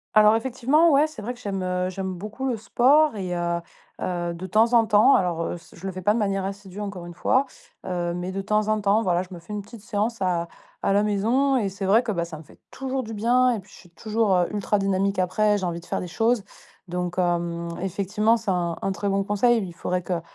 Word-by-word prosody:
Alors, 215 Hz, 0 st, +7 dB
effectivement, 260 Hz, +7 st, +3 dB
ouais, 290 Hz, +2 st, +5 dB
c'est 310 Hz, -9 st, -10 dB
vrai 245 Hz, +4 st, -3 dB
que 245 Hz, -, -16 dB
j'aime, 195 Hz, -5 st, -3 dB
heu, 180 Hz, 0 st, -1 dB
j'aime 190 Hz, 0 st, -4 dB
beaucoup 210 Hz, +8 st, -6 dB
le 250 Hz, -, 0 dB
sport 265 Hz, +6 st, +3 dB
et 185 Hz, -3 st, -3 dB
heu 170 Hz, 0 st, -1 dB, 0.4 s
heu, 175 Hz, -1 st, -2 dB
de 175 Hz, +2 st, -7 dB
temps 220 Hz, +6 st, +3 dB
en 230 Hz, -1 st, +6 dB
temps, 220 Hz, +5 st, +5 dB
alors 175 Hz, -3 st, +1 dB
heu, 175 Hz, -, -3 dB
c 165 Hz, -, -17 dB
je 180 Hz, +3 st, -7 dB
le -, -, -2 dB
fais 185 Hz, 0 st, -8 dB
pas 210 Hz, -, +4 dB
de 235 Hz, -, 0 dB
manière 195 Hz, -2 st, 0 dB
assidue, 195 Hz, 0 st, -7 dB
encore 195 Hz, -4 st, -6 dB
une 175 Hz, -, -10 dB
fois, 270 Hz, +9 st, +2 dB, 0.4 s
heu, 175 Hz, -2 st, -2 dB
mais 180 Hz, +1 st, -4 dB
de 195 Hz, +1 st, -3 dB
temps 210 Hz, +2 st, +1 dB
en 215 Hz, 0 st, +1 dB
temps, 205 Hz, +2 st, +3 dB
voilà, 180 Hz, -4 st, +1 dB
je 185 Hz, -, -15 dB
me 175 Hz, -, -8 dB
fais 170 Hz, +5 st, -10 dB
une 205 Hz, -1 st, -4 dB
petite 220 Hz, +1 st, -12 dB
séance 215 Hz, +1 st, -2 dB
à 175 Hz, -2 st, 0 dB, 0.4 s
à -, -, +2 dB
la 200 Hz, -, +4 dB
maison 230 Hz, +7 st, +2 dB
et 215 Hz, -5 st, 0 dB
c'est 195 Hz, +1 st, -5 dB
vrai 215 Hz, +6 st, +4 dB
que, 225 Hz, -, -2 dB
bah, 170 Hz, -4 st, -1 dB
ça 165 Hz, -2 st, -8 dB
me 155 Hz, -, -11 dB
fait -, -, -20 dB
toujours 265 Hz, 0 st, -3 dB
du 225 Hz, -2 st, -7 dB
bien 250 Hz, +4 st, +3 dB
et -, -, -4 dB
puis 195 Hz, +1 st, -16 dB
je -, -, -14 dB
suis 175 Hz, -, -17 dB
toujours, 215 Hz, +2 st, 0 dB
heu, 180 Hz, -1 st, +2 dB
ultra 210 Hz, +1 st, +1 dB
dynamique 195 Hz, 0 st, 0 dB
après. 205 Hz, +3 st, +2 dB
J'ai 195 Hz, -, -5 dB
envie 170 Hz, -1 st, -3 dB
de 170 Hz, -, -15 dB
faire -, -, -2 dB
des 180 Hz, -, -5 dB
choses 225 Hz, +4 st, +1 dB, 0.4 s
donc 180 Hz, 0 st, -3 dB
hem, 170 Hz, -1 st, 0 dB
effectivement, 205 Hz, +4 st, +1 dB
c'est 220 Hz, -3 st, -2 dB
un 175 Hz, -2 st, -1 dB
un 195 Hz, -, 0 dB
très 190 Hz, +2 st, -2 dB
bon 195 Hz, 0 st, +1 dB
conseil. 215 Hz, +3 st, +2 dB
Il 175 Hz, -, -9 dB
faudrait 180 Hz, +1 st, -2 dB
que 175 Hz, -1 st, -2 dB
200 Hz, 255 wpm, -24 LUFS, 180-225 Hz, 0.4 s, Alors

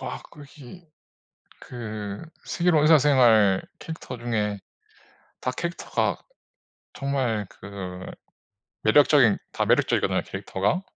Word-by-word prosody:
와 -, -, -6 dB
거기 150 Hz, +3 st, -14 dB, 0.7 s
그 105 Hz, -4 st, -6 dB, 0.2 s
슬기로운 170 Hz, -3 st, +2 dB
의사생활 125 Hz, -10 st, +5 dB, 0.2 s
캐릭터 160 Hz, -5 st, -7 dB
중에 105 Hz, -4 st, -2 dB, 0.8 s
다 130 Hz, -, -1 dB
캐릭터가 170 Hz, +7 st, -2 dB, 0.7 s
정말 130 Hz, -7 st, -1 dB
그 95 Hz, -2 st, -8 dB, 0.8 s
매력적인 130 Hz, -1 st, +5 dB
다 -, -, -1 dB
매력적이거든요 -, -, +2 dB
캐릭터가. 100 Hz, -, -2 dB
120 Hz, 225 characters per minute, -25 LUFS, 105-145 Hz, 0.8 s, 의사생활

